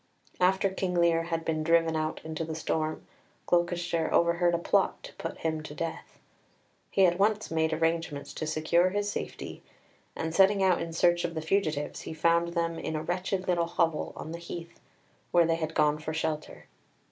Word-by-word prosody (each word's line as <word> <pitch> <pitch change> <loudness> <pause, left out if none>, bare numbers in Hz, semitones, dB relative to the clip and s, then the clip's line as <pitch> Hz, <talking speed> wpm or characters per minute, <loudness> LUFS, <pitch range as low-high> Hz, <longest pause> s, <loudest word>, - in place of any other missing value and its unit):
After 190 +2 +3
King 185 -1 -2
Lear 170 -1 +3
had 165 -1 -3
been 155 -1 0
driven 165 0 +3
out 155 0 -2
into 160 0 -4
the 160 0 -4
storm, 155 0 -2 0.4
Gloucester 175 -1 +1
overheard 170 0 +3
a - - +2
plot 170 - +1
to - - -10
put - - -6
him 160 -1 -2
to 150 -1 -9
death. 165 0 -5 0.7
He 195 - +4
at 175 +1 +2
once 210 -1 +1
made 160 0 +1
arrangements 165 -2 -1
to 155 - -4
secure 160 +3 +2
his 205 +1 -1
safety, - - -6 0.5
and, 160 0 -3
setting 195 +2 +5
out 185 -2 +3
in 165 0 -4
search 175 +1 +3
of 170 -1 -3
the - - -1
fugitives, 155 -5 -1
he 160 - -7
found 170 +2 +2
them 165 -1 -1
in 160 - -3
a 155 - -2
wretched 185 +2 -2
little 170 -2 +2
hovel 170 -2 0
on 155 - -7
the 170 - -5
heath, 170 0 -8 0.5
where 170 -1 +5
they 165 0 +1
had 160 -1 -4
gone 150 0 +3
for 155 +1 -4
shelter. 160 -1 -3
165 Hz, 185 wpm, -29 LUFS, 160-175 Hz, 0.7 s, setting